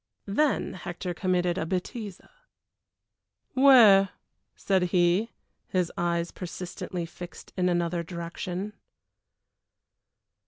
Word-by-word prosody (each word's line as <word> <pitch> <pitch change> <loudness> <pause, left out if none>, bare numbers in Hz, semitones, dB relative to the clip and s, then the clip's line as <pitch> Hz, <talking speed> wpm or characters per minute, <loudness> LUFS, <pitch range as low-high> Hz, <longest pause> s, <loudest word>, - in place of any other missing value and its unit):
Then 275 +9 +1
Hector 180 0 -5
committed 180 0 0
a - - -1
bêtise. 190 +2 -4 1.3
"Where?" 235 -8 +7 0.5
said 190 -2 +1
he, 180 +5 +2 0.4
his 180 -2 0
eyes 170 0 -1
persistently 180 0 -6
fixed 175 +1 -11
in 180 -1 +1
another 175 0 0
direction. 175 +3 -5
180 Hz, 85 wpm, -27 LUFS, 175-195 Hz, 1.3 s, Where